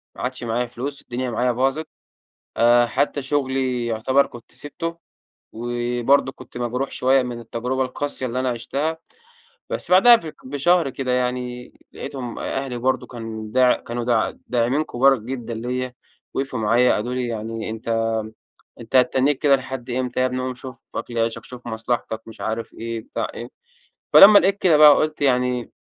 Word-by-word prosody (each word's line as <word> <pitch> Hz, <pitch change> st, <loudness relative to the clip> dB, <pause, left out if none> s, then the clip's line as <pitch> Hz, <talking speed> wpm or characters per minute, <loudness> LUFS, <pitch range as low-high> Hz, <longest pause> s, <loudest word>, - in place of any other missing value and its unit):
ما -, -, -9 dB
عادش 125 Hz, 0 st, -4 dB
معايا 120 Hz, +1 st, -1 dB
فلوس، 135 Hz, +4 st, -6 dB
الدنيا 125 Hz, 0 st, -4 dB
معايا 125 Hz, +2 st, +1 dB
باظت، 135 Hz, +6 st, 0 dB, 0.7 s
آآ 120 Hz, +1 st, +5 dB
حتّى 140 Hz, +2 st, -1 dB
شغلي 130 Hz, -3 st, -1 dB
يعتبر 125 Hz, +5 st, +2 dB
كنت 120 Hz, -2 st, -14 dB
سبته، 165 Hz, +3 st, -6 dB, 0.6 s
وبرضو 120 Hz, +3 st, +1 dB
كنت 125 Hz, -, -12 dB
مجروح 125 Hz, +3 st, -2 dB
شويّة 130 Hz, 0 st, +3 dB
من 120 Hz, -1 st, -5 dB
التجربة 125 Hz, +3 st, -2 dB
القاسية 130 Hz, +1 st, -4 dB
اللي 125 Hz, +1 st, -2 dB
أنا 130 Hz, 0 st, 0 dB
عشتها، 140 Hz, +7 st, -2 dB, 0.7 s
بس -, -, -4 dB
بعدها 215 Hz, +7 st, +8 dB, 0.3 s
بشهر 145 Hz, +3 st, +2 dB
كده 130 Hz, -1 st, -4 dB
يعني 125 Hz, 0 st, -2 dB, 0.2 s
لقيتهم 125 Hz, -3 st, -6 dB
أهلي 135 Hz, -2 st, -3 dB
برضو 130 Hz, +2 st, 0 dB
كان 110 Hz, -2 st, -7 dB
داع 130 Hz, 0 st, +5 dB
كانوا 120 Hz, -1 st, 0 dB
د -, -, -19 dB
داعمين 125 Hz, +5 st, +1 dB
كبار 135 Hz, 0 st, +3 dB
جدًا 120 Hz, 0 st, -6 dB
ليّ، 125 Hz, +2 st, -3 dB, 0.4 s
وقفوا 135 Hz, -2 st, -2 dB
معايا 115 Hz, +3 st, +3 dB
قالوا 120 Hz, +4 st, -2 dB
لي: 125 Hz, -1 st, -2 dB
"يعني 115 Hz, 0 st, -4 dB
أنتَ 110 Hz, +1 st, -7 dB, 0.9 s
أنتَ 115 Hz, +3 st, -2 dB
هتتنّيك 130 Hz, +2 st, +3 dB
كده 140 Hz, -2 st, +4 dB
لحد 130 Hz, -2 st, -7 dB
إمتى؟ 125 Hz, 0 st, -2 dB
يا 130 Hz, -, +3 dB
ابني 130 Hz, 0 st, -2 dB
قوم 130 Hz, 0 st, -3 dB
شوف 130 Hz, 0 st, -10 dB, 0.2 s
أكل 120 Hz, -1 st, -4 dB
عيشك 115 Hz, 0 st, -1 dB
شوف 125 Hz, -1 st, -11 dB
مصلحتك،" 115 Hz, -1 st, -3 dB
مش 115 Hz, -, -12 dB
عارف 110 Hz, +1 st, -4 dB
إيه 115 Hz, 0 st, -5 dB
بتاع 110 Hz, -, -4 dB
إيه، -, -, -7 dB, 0.6 s
فلمّا 205 Hz, +1 st, +10 dB
لقيت 195 Hz, +1 st, +2 dB
كده 175 Hz, -6 st, +4 dB
بقى 150 Hz, -1 st, +9 dB
قلت 155 Hz, -1 st, -1 dB
يعني 125 Hz, -2 st, +1 dB
125 Hz, 160 wpm, -22 LUFS, 120-135 Hz, 0.9 s, فلمّا